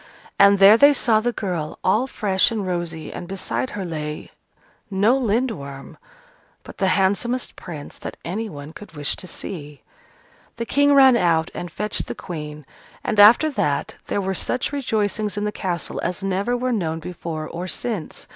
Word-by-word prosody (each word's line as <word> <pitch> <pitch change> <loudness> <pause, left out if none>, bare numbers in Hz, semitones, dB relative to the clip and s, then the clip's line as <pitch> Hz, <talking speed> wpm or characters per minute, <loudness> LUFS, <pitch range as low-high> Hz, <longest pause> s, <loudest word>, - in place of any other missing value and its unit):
And 200 0 +7
there 200 +3 +8
they 285 +3 +7
saw 230 -5 +3
the 240 +2 0
girl, 180 -9 -4
all 215 +7 +2
fresh 195 -7 +2
and 215 -4 -3
rosy, 170 -3 -3
and 175 - -7
beside 195 +7 -2
her 195 - -3
lay 150 -3 -5 0.6
no 205 +5 +3
Lindworm, 215 - -2 0.7
but - - -12
the 195 - +2
handsomest 205 +6 0
prince 155 -5 -9
that - - -7
any 215 +6 -3
one 145 -1 -9
could 210 -2 -12
wish 145 -2 0
to 185 - -6
see. 150 -6 -7 0.7
The 230 - -4
King 285 +3 +3
ran 265 -2 +7
out 165 -6 +2
and 175 - -5
fetched 210 +4 -3
the - - -5
Queen: 150 -4 -7 0.4
and 215 - -1
after 235 +9 +7
that, 190 - -1
there - - -1
were 190 -1 -1
such 250 +7 -1
rejoicings 215 -5 -1
in 205 - -1
the 210 - -1
castle 175 -6 -3
as 180 +2 -3
never 195 +6 0
were 250 0 -1
known 165 -7 -1
before 160 -2 -6
or 175 +2 -5
since. 205 -2 -3
195 Hz, 170 wpm, -22 LUFS, 165-225 Hz, 0.7 s, there